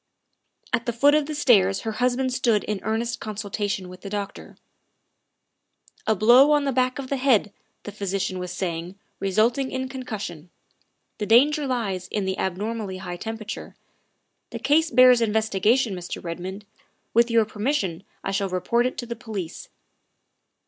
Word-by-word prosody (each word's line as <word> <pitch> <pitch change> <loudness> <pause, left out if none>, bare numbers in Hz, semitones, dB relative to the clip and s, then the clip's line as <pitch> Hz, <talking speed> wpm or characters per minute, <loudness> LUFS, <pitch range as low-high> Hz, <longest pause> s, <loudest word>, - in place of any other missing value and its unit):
At 235 -2 0
the 235 - 0
foot 280 +5 +4
of 300 -1 +2
the 305 - -4
stairs 200 -9 +4
her 225 - -3
husband 250 +3 0
stood 240 -5 +2
in 210 -2 -3
earnest 230 +2 -2
consultation 205 -2 -3
with 180 0 -12
the 200 - -7
doctor. 205 -1 -6 1.5
"A 220 - +3
blow 245 +9 +6
on 295 -1 +3
the 275 - 0
back 255 0 +1
of 270 -2 -6
the 275 - 0
head," 245 -6 +2 0.3
the 205 - -7
physician 195 -2 -2
was 180 -1 -5
saying, 175 0 -4
" - - -46
resulting 230 +7 +1
in 260 0 -3
concussion. 210 - -6 0.7
The 210 - -2
danger 285 +6 +4
lies 200 -8 -2
in 200 0 -2
the 190 0 -2
abnormally 200 +1 -3
high 175 -1 -6
temperature. 220 +2 -6 0.7
The - - -6
case 315 +4 +2
bears 250 0 +6
inves 220 0 +1
tigation, 220 +3 +2
Mr. 180 -1 -6
Redmond. 185 +4 -6 0.5
With 235 +1 +4
your 230 -1 +4
permission 205 - -2 0.2
I - - -2
shall 195 0 -1
report 210 +7 +1
it 255 - -6
to 240 - -4
the 235 0 -5
police." 215 -8 -6
220 Hz, 165 wpm, -24 LUFS, 195-255 Hz, 1.5 s, blow